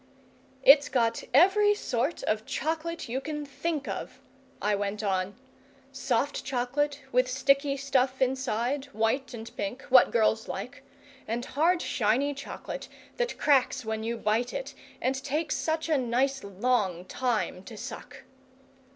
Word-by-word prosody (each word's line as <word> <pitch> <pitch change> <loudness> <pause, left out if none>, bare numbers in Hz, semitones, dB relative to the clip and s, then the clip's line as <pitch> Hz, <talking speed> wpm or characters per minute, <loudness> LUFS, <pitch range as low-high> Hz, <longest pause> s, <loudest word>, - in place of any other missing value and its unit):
"It's 280 +2 +7
got 235 -3 +1
every 390 - +5
sort 260 - -2
of 215 0 0
chocolate 325 +1 -2
you 255 +3 -2
can 300 0 -4
think 295 +1 -3
of," - - -5 0.4
I 210 +1 +1
went 205 +1 -2
on: 190 -1 -1 0.6
"soft 270 0 -1
chocolate, 280 +3 -1
with 250 +1 +3
sticky 275 +2 +2
stuff 265 -1 +1
inside, 260 +1 0
white 225 +5 0
and 225 0 -9
pink, 225 +6 -4
what 255 -1 +7
girls 220 -1 +2
like; 250 +7 -6 0.4
and 235 +3 -2
hard 335 +6 +2
shiny 250 +6 +1
chocolate, 280 0 -7 0.3
that 485 0 -1
cracks 265 -3 +2
when 220 0 -2
you 230 +1 -2
bite 225 +3 0
it, - - -5 0.3
and 265 +1 -1
takes 300 +3 -1
such 320 0 -1
a 310 -4 +2
nice 260 +3 0
long 200 -3 0
time 230 -6 -1
to 225 - -9
suck!" - - -8
260 Hz, 140 wpm, -28 LUFS, 225-285 Hz, 0.6 s, It's